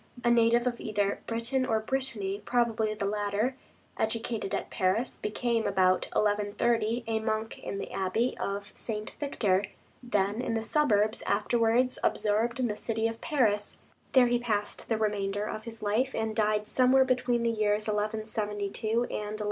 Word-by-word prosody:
A 240 Hz, -, +4 dB
native 235 Hz, +1 st, +4 dB
of 240 Hz, -1 st, -1 dB
either 205 Hz, -2 st, 0 dB
Britain 235 Hz, +3 st, 0 dB
or 225 Hz, -4 st, +1 dB
Brittany, 220 Hz, -5 st, -2 dB
probably 225 Hz, -2 st, +1 dB
the 200 Hz, -, -3 dB
latter; 205 Hz, +4 st, 0 dB, 0.4 s
educated 225 Hz, -2 st, -2 dB
at -, -, -4 dB
Paris; 195 Hz, +7 st, 0 dB
became, 230 Hz, +1 st, 0 dB
about 185 Hz, -1 st, +2 dB
1130, 215 Hz, +3 st, +1 dB
a 225 Hz, -1 st, 0 dB
monk 220 Hz, 0 st, -2 dB
in 200 Hz, -, -5 dB
the -, -, -5 dB
Abbey 195 Hz, +6 st, 0 dB
of 200 Hz, +1 st, -3 dB
St. 215 Hz, -2 st, -4 dB
Victor, 205 Hz, -9 st, +1 dB, 0.4 s
then 210 Hz, -2 st, 0 dB
in 230 Hz, -2 st, -1 dB
the 225 Hz, -, -1 dB
suburbs, 220 Hz, -6 st, +2 dB
afterwards 230 Hz, +4 st, +2 dB
absorbed 220 Hz, +4 st, +1 dB
in 250 Hz, -, +2 dB
the 210 Hz, -, -2 dB
city 225 Hz, +1 st, -1 dB
of 225 Hz, 0 st, -6 dB
Paris; 220 Hz, -9 st, +1 dB, 0.4 s
there 260 Hz, -2 st, +7 dB
he 240 Hz, 0 st, +2 dB
passed 210 Hz, -4 st, -2 dB
the 225 Hz, -, +2 dB
remainder 205 Hz, -1 st, -1 dB
of 215 Hz, 0 st, -5 dB
his 225 Hz, -2 st, -4 dB
life, 230 Hz, +6 st, +1 dB
and 220 Hz, -1 st, -2 dB
died 210 Hz, -1 st, +1 dB
somewhere 260 Hz, +3 st, +4 dB
between 245 Hz, -2 st, +1 dB
the 230 Hz, -, +2 dB
years 210 Hz, -1 st, +1 dB
1172 210 Hz, 0 st, -2 dB
and 220 Hz, +1 st, +1 dB
1192. 210 Hz, -3 st, -3 dB
220 Hz, 160 wpm, -29 LUFS, 210-235 Hz, 0.4 s, there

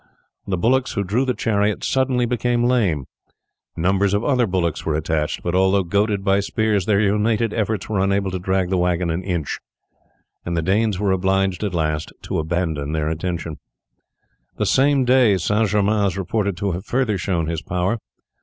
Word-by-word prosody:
The 95 Hz, -, -1 dB
bullocks 125 Hz, +7 st, +1 dB
who 100 Hz, -, -1 dB
drew 110 Hz, +8 st, 0 dB
the 125 Hz, -2 st, 0 dB
chariot 105 Hz, -2 st, 0 dB
suddenly 130 Hz, -2 st, +1 dB
became 120 Hz, 0 st, 0 dB
lame; 105 Hz, -, +1 dB, 0.7 s
numbers 95 Hz, +3 st, +2 dB
of 105 Hz, -, 0 dB
other 125 Hz, -4 st, +2 dB
bullocks 85 Hz, -4 st, -1 dB
were 80 Hz, -, -1 dB
attached, 75 Hz, 0 st, -1 dB
but 85 Hz, -, -2 dB
although 95 Hz, +1 st, +3 dB
goaded 100 Hz, +3 st, 0 dB
by 100 Hz, 0 st, +3 dB
spears 105 Hz, -1 st, 0 dB
their 100 Hz, -2 st, +3 dB
united 105 Hz, +2 st, +1 dB
efforts 110 Hz, -2 st, -1 dB
were 105 Hz, -3 st, -1 dB
unable 100 Hz, 0 st, +1 dB
to 95 Hz, -, -3 dB
drag 95 Hz, 0 st, 0 dB
the 95 Hz, -, +2 dB
wagon 90 Hz, -1 st, 0 dB
an 85 Hz, +3 st, -2 dB
inch, 85 Hz, -5 st, -3 dB, 0.8 s
and 85 Hz, 0 st, -3 dB
the 80 Hz, -, 0 dB
Danes 100 Hz, +2 st, +1 dB
were 100 Hz, -1 st, +1 dB
obliged 95 Hz, +1 st, +1 dB
at 100 Hz, -4 st, -2 dB
last 75 Hz, -2 st, -1 dB
to -, -, -2 dB
abandon 80 Hz, -3 st, -2 dB
their 80 Hz, 0 st, -1 dB
intention. 85 Hz, -1 st, -4 dB, 1.0 s
The -, -, 0 dB
same 135 Hz, -1 st, +3 dB
day 125 Hz, -5 st, +4 dB
St. 105 Hz, +5 st, +1 dB
Germain 105 Hz, +1 st, +2 dB
is 95 Hz, -, -3 dB
reported 100 Hz, 0 st, -1 dB
to 100 Hz, +2 st, -1 dB
have 90 Hz, +2 st, -4 dB
further 115 Hz, -5 st, 0 dB
shown 85 Hz, -3 st, -1 dB
his 80 Hz, -1 st, -3 dB
power. 90 Hz, +6 st, -1 dB
95 Hz, 180 wpm, -21 LUFS, 90-110 Hz, 1.0 s, day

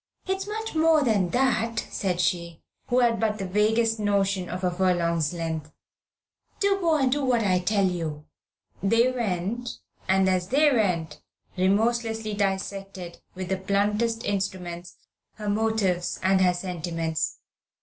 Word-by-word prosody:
"It's 385 Hz, +1 st, -2 dB
much 440 Hz, +1 st, -4 dB
more 320 Hz, -1 st, +4 dB
than 205 Hz, -8 st, +2 dB
that," 230 Hz, -1 st, +1 dB
said 180 Hz, -3 st, -1 dB
she, 170 Hz, -2 st, -1 dB, 0.2 s
who 250 Hz, +1 st, +3 dB
had 235 Hz, -2 st, +2 dB
but 215 Hz, -1 st, 0 dB
the 195 Hz, -, -4 dB
vaguest 220 Hz, +4 st, +2 dB
notion 200 Hz, -3 st, +1 dB
of 185 Hz, +1 st, -5 dB
a 180 Hz, -, +2 dB
furlong's 170 Hz, -4 st, +1 dB
length. 160 Hz, -3 st, -4 dB, 0.9 s
"Do 395 Hz, -1 st, +2 dB
go 335 Hz, -4 st, +2 dB
and 265 Hz, -3 st, +2 dB
do 290 Hz, +1 st, +1 dB
what 245 Hz, -3 st, +2 dB
I 185 Hz, -3 st, +2 dB
tell 200 Hz, +2 st, +1 dB
you." 160 Hz, -5 st, -3 dB, 0.6 s
They 230 Hz, +6 st, +3 dB
went, 235 Hz, +1 st, -3 dB, 0.3 s
and, 190 Hz, 0 st, +3 dB
as 185 Hz, -1 st, +1 dB
they 290 Hz, +6 st, +4 dB
went, 170 Hz, -, 0 dB, 0.3 s
remorselessly 225 Hz, +3 st, +1 dB
dissected, 195 Hz, -2 st, -3 dB
with 185 Hz, -1 st, -5 dB
the 190 Hz, -, 0 dB
bluntest 210 Hz, +4 st, 0 dB
instruments, 185 Hz, -3 st, -3 dB, 0.4 s
her 210 Hz, -1 st, -7 dB
motives 205 Hz, -4 st, 0 dB
and 190 Hz, 0 st, +3 dB
her 180 Hz, -1 st, +4 dB
sentiments. 165 Hz, -3 st, -3 dB
195 Hz, 140 wpm, -26 LUFS, 180-230 Hz, 0.9 s, more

